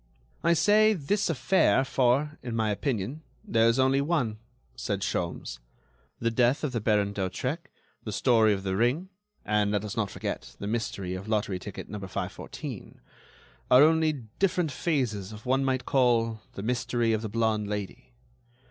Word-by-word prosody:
"I 170 Hz, -, +4 dB
say 215 Hz, +5 st, +5 dB
'this 200 Hz, +4 st, 0 dB
affair,' 145 Hz, -1 st, +3 dB
for, 135 Hz, +4 st, +1 dB
in 120 Hz, -2 st, -4 dB
my 110 Hz, -2 st, +1 dB
opinion, 125 Hz, +4 st, -2 dB, 0.2 s
there 115 Hz, 0 st, +3 dB
is 115 Hz, +2 st, +3 dB
only 130 Hz, +1 st, +3 dB
one," 140 Hz, -9 st, 0 dB, 0.4 s
said 100 Hz, -1 st, -3 dB
Sholmes. 90 Hz, -8 st, -3 dB, 0.6 s
"The 115 Hz, 0 st, 0 dB
death 125 Hz, +5 st, +2 dB
of 150 Hz, -, 0 dB
the 115 Hz, -3 st, -2 dB
Baron 105 Hz, -2 st, +2 dB
d'Hautrec, 125 Hz, -, -3 dB, 0.3 s
the 110 Hz, -, -5 dB
story 110 Hz, 0 st, +4 dB
of 95 Hz, -2 st, -1 dB
the 95 Hz, -1 st, -1 dB
ring, 125 Hz, -, +1 dB, 0.4 s
and, 105 Hz, -1 st, +2 dB
let 105 Hz, 0 st, 0 dB
us 105 Hz, -, -5 dB
not 110 Hz, -3 st, 0 dB
forget, -, -, -5 dB
the -, -, -6 dB
mystery 100 Hz, -4 st, -2 dB
of 95 Hz, +3 st, -6 dB
lottery 105 Hz, -4 st, 0 dB
ticket 100 Hz, +1 st, -8 dB
number 100 Hz, -1 st, -6 dB
514, -, -, -6 dB, 0.7 s
are 125 Hz, +3 st, +8 dB
only 160 Hz, 0 st, +4 dB, 0.3 s
different 180 Hz, -5 st, +1 dB
phases 125 Hz, -, -1 dB
of 105 Hz, 0 st, -11 dB
what 125 Hz, -, 0 dB
one 135 Hz, -, 0 dB
might 130 Hz, -2 st, 0 dB
call 115 Hz, -4 st, +2 dB
the 100 Hz, -, -6 dB
mystery 120 Hz, 0 st, 0 dB
of 110 Hz, -, 0 dB
the 110 Hz, -, -4 dB
blonde 110 Hz, -1 st, 0 dB
Lady. 105 Hz, -2 st, -5 dB
115 Hz, 165 wpm, -28 LUFS, 105-135 Hz, 0.7 s, are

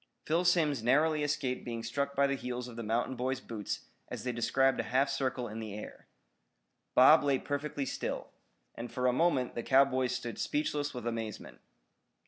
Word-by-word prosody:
Phil 165 Hz, +3 st, +2 dB
Simms 160 Hz, -7 st, +3 dB
narrowly 150 Hz, +6 st, +3 dB
escaped 140 Hz, -3 st, -1 dB
being 115 Hz, -1 st, -5 dB
struck 140 Hz, +4 st, -2 dB
by 140 Hz, -, +4 dB
the 140 Hz, -, +1 dB
heels 125 Hz, -2 st, -4 dB
of 120 Hz, -, -10 dB
the 115 Hz, -, -5 dB
mountain 115 Hz, +4 st, -1 dB
boy's 130 Hz, +1 st, -1 dB
boots 110 Hz, -5 st, -5 dB, 0.3 s
as -, -, -6 dB
they 125 Hz, -, -1 dB
described 130 Hz, +3 st, +2 dB
a -, -, +1 dB
half 135 Hz, +2 st, +2 dB
circle 130 Hz, -2 st, -1 dB
in 110 Hz, +1 st, -6 dB
the 110 Hz, -2 st, -6 dB
air. 105 Hz, -, -9 dB, 0.9 s
Bob 150 Hz, +5 st, +8 dB
lay 140 Hz, -2 st, +3 dB
perfectly 145 Hz, 0 st, -3 dB
still. -, -, -4 dB, 0.4 s
And 120 Hz, 0 st, -7 dB
for 125 Hz, -, -2 dB
a 125 Hz, -, +4 dB
moment 140 Hz, -4 st, +2 dB
the 120 Hz, -, -3 dB
cowboys 130 Hz, -1 st, +3 dB
stood 120 Hz, -1 st, -5 dB
speechless 145 Hz, -1 st, -1 dB
with 120 Hz, -2 st, -6 dB
amazement. 115 Hz, -3 st, -5 dB
130 Hz, 180 wpm, -31 LUFS, 120-140 Hz, 0.9 s, Bob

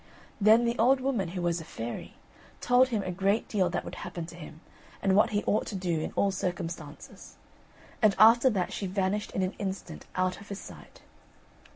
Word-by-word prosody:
Then 220 Hz, +3 st, +6 dB
the 235 Hz, +1 st, -1 dB
old 260 Hz, +4 st, +4 dB
woman, 255 Hz, -8 st, -1 dB
who 175 Hz, +1 st, -5 dB
was 170 Hz, -1 st, 0 dB
a -, -, -8 dB
fairy, 120 Hz, -6 st, -7 dB, 0.4 s
told 250 Hz, +1 st, +4 dB
him 220 Hz, -5 st, -1 dB
a 185 Hz, -, -3 dB
great 195 Hz, +4 st, 0 dB
deal 190 Hz, -4 st, +1 dB
that 175 Hz, -, -3 dB
would -, -, -7 dB
happen 170 Hz, -2 st, -6 dB
to 170 Hz, +1 st, -11 dB
him, 160 Hz, -2 st, -11 dB, 0.4 s
and 190 Hz, -1 st, +2 dB
what 210 Hz, +3 st, +5 dB
he 210 Hz, -2 st, -1 dB
ought 210 Hz, -, 0 dB
to -, -, -5 dB
do 175 Hz, -4 st, -1 dB
in 155 Hz, -, -4 dB
all 200 Hz, -, +2 dB
circumstances; 170 Hz, -5 st, -6 dB, 0.7 s
and 215 Hz, -3 st, +4 dB
after 235 Hz, +4 st, +7 dB
that 190 Hz, -6 st, -1 dB
she 195 Hz, -, -3 dB
vanished 195 Hz, +2 st, -1 dB
in 190 Hz, -, 0 dB
an 185 Hz, +2 st, -2 dB
instant 195 Hz, -1 st, -5 dB
out 185 Hz, +1 st, -1 dB
of 205 Hz, -, -14 dB
his 200 Hz, -, -5 dB
sight. -, -, -13 dB
195 Hz, 200 wpm, -28 LUFS, 175-215 Hz, 0.7 s, after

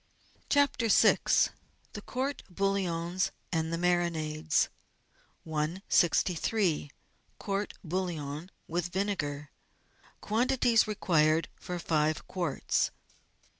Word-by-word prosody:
CHAPTER 285 Hz, -5 st, +3 dB
VI 215 Hz, -, +6 dB, 0.8 s
The 210 Hz, -, -6 dB
Court 265 Hz, +6 st, -3 dB
bouillons 185 Hz, -2 st, 0 dB, 0.2 s
and 160 Hz, -1 st, 0 dB
the 165 Hz, -, -1 dB
Marinades 160 Hz, -3 st, +1 dB, 0.8 s
163— 170 Hz, +2 st, +1 dB, 0.5 s
COURT= 200 Hz, +1 st, -3 dB
BOUILLON 165 Hz, -3 st, -3 dB, 0.2 s
WITH 175 Hz, +1 st, -1 dB
VINEGAR 150 Hz, -7 st, -2 dB, 0.7 s
Quantities 240 Hz, +1 st, +2 dB
Required 165 Hz, -6 st, +2 dB
for 180 Hz, -, -6 dB
Five 155 Hz, -2 st, 0 dB
Quarts. 175 Hz, -7 st, 0 dB
175 Hz, 80 wpm, -30 LUFS, 155-200 Hz, 0.8 s, VI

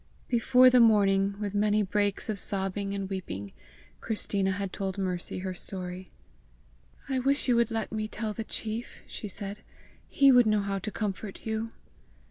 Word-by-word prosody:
Before 255 Hz, +1 st, +5 dB
the 250 Hz, -, +6 dB
morning, 200 Hz, -3 st, +4 dB
with 205 Hz, -2 st, -3 dB
many 210 Hz, +1 st, +2 dB
breaks 205 Hz, 0 st, 0 dB
of 215 Hz, -3 st, -2 dB
sobbing 195 Hz, 0 st, -2 dB
and 195 Hz, -1 st, -3 dB
weeping, 100 Hz, -, -5 dB, 0.5 s
Christina 200 Hz, -3 st, -1 dB
had 195 Hz, 0 st, -4 dB
told 195 Hz, -1 st, -3 dB
Mercy 185 Hz, -2 st, -3 dB
her 185 Hz, 0 st, -3 dB
story. 185 Hz, 0 st, -6 dB, 1.0 s
"I 265 Hz, -2 st, 0 dB
wish 275 Hz, +3 st, +1 dB
you 245 Hz, -, +4 dB
would 235 Hz, 0 st, +3 dB
let 225 Hz, -1 st, -2 dB
me 215 Hz, 0 st, -2 dB
tell 215 Hz, 0 st, -4 dB
the 225 Hz, -, -4 dB
chief!" 220 Hz, +1 st, -5 dB
she 210 Hz, -, -6 dB
said. 200 Hz, +1 st, -5 dB, 0.5 s
"He 275 Hz, -1 st, +6 dB
would 245 Hz, -3 st, +6 dB
know 215 Hz, -1 st, +3 dB
how 200 Hz, 0 st, -2 dB
to 215 Hz, -, -4 dB
comfort 205 Hz, -1 st, -4 dB
you." 220 Hz, 0 st, -2 dB
205 Hz, 165 wpm, -29 LUFS, 195-225 Hz, 1.0 s, the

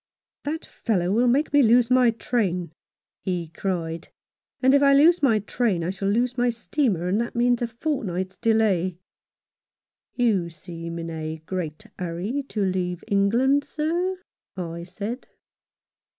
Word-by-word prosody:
" -, -, -70 dB
That 315 Hz, +2 st, -3 dB
fellow 185 Hz, -6 st, -1 dB
will 235 Hz, +4 st, +3 dB
make 280 Hz, +6 st, +2 dB
me 290 Hz, -, +6 dB
lose 240 Hz, 0 st, +4 dB
my 250 Hz, -1 st, +6 dB
train," 195 Hz, -8 st, -1 dB, 0.5 s
he 175 Hz, -3 st, -3 dB
cried, 165 Hz, -2 st, -3 dB, 0.5 s
"and 260 Hz, +1 st, +4 dB
if 280 Hz, -, +5 dB
I 275 Hz, -1 st, +6 dB
lose 325 Hz, +5 st, +5 dB
my 245 Hz, -6 st, +4 dB
train 210 Hz, -3 st, 0 dB
I 175 Hz, -, -1 dB
shall 195 Hz, +1 st, -3 dB
lose 245 Hz, +4 st, +1 dB
my 245 Hz, 0 st, +3 dB
steamer, 230 Hz, -, 0 dB
and 200 Hz, +5 st, +1 dB
that 235 Hz, -, -4 dB
means 245 Hz, 0 st, +2 dB
a 240 Hz, -, 0 dB
fortnight's 215 Hz, -, -3 dB
delay." 200 Hz, -6 st, +1 dB, 1.2 s
"You 210 Hz, -9 st, +2 dB
seem 170 Hz, 0 st, -8 dB
in 165 Hz, 0 st, -5 dB
a 160 Hz, 0 st, -5 dB
great 175 Hz, +1 st, -4 dB
hurry 180 Hz, +10 st, -2 dB
to 210 Hz, -, -1 dB
leave 180 Hz, -2 st, -2 dB
England, 235 Hz, +8 st, +3 dB
sir," 340 Hz, +6 st, -1 dB, 0.4 s
I 170 Hz, -1 st, -5 dB
said. 205 Hz, +7 st, -6 dB
210 Hz, 150 wpm, -24 LUFS, 175-245 Hz, 1.2 s, me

